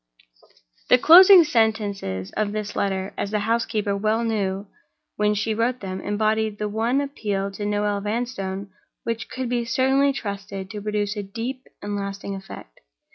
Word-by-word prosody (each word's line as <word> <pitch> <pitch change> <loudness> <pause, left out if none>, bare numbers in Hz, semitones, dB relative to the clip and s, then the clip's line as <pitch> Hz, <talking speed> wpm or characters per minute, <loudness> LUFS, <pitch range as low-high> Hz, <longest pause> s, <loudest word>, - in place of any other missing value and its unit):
The 250 - +7
closing 360 +6 +9
sentences 205 - 0
of 210 -1 -2
this 215 -1 -4
letter—as 195 0 -2
the 210 0 -1
housekeeper 220 -2 0
well 215 +3 0
knew 200 -3 -1 0.5
when 210 0 +1
she 215 +2 0
wrote 235 +3 0
them—embodied 210 +3 -1
the 210 - -2
one 225 +6 0
appeal 205 -8 -3
to 205 +1 -4
Noel 205 -1 0
Vanstone 200 -3 -3 0.3
which 230 0 -3
could 260 -1 -4
be 240 0 0
certainly 265 +4 +2
trusted 200 -5 -6
to 210 - -6
produce 210 0 -1
a 205 - -3
deep 235 +6 -6 0.2
and 205 0 -3
lasting 200 0 -4
effect. 190 - -10
210 Hz, 145 wpm, -23 LUFS, 200-230 Hz, 0.5 s, closing